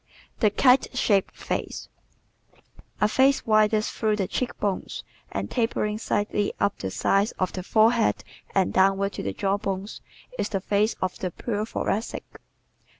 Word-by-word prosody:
The 215 - +4
Kite 255 +4 +3
Shaped 200 -6 +2
Face - - -4 0.7
¶ - - -28 0.4
A 210 - +4
face 265 +5 +3
widest 215 0 +3
through 215 -2 0
the 195 -3 -1
cheek 250 +5 -3
bones 200 -2 -2 0.3
and - - -4
tapering 215 -3 0
slightly 205 -1 -1
up 200 - 0
the 95 - -3
sides 195 - +1
of 185 - -2
the 185 - -4
forehead 220 +4 +3 0.3
and 195 -2 +2
downward 195 +1 +3
to - - -5
the 100 - -2
jaw 195 - 0
bones 195 +1 -4 0.4
is 200 - 0
the 195 - -1
face 205 +3 +1
of 185 - -2
the 185 - -2
pure 215 +4 -3
Thoracic. 220 0 -2
205 Hz, 155 wpm, -25 LUFS, 195-220 Hz, 0.7 s, The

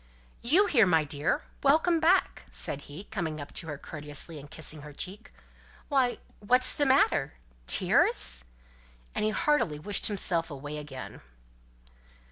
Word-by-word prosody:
"You 330 +13 +4
here, 235 - +4
my 160 -3 +3
dear! 145 0 -1 0.2
Welcome 320 +4 +3
back," 345 +4 +2
said 140 - -4
he, 155 +7 -8
coming 170 -8 -4
up 145 - -9
to 165 - -4
her 150 -2 -5
courteously, 150 +1 -5
and 145 +1 -12
kissing 155 -1 -4
her 150 0 -11
cheek. 195 +9 -5 0.6
"Why, 265 -4 +2 0.2
what's 250 +5 +4
the 290 - +1
matter? 150 - +2 0.3
Tears?" - - +4 0.7
and - - -1
he 215 - +2
heartily 215 - +1
wished 200 +7 -1
himself 175 -5 0
away 145 +1 -7
again. 140 -3 -9
165 Hz, 140 wpm, -28 LUFS, -, 0.7 s, You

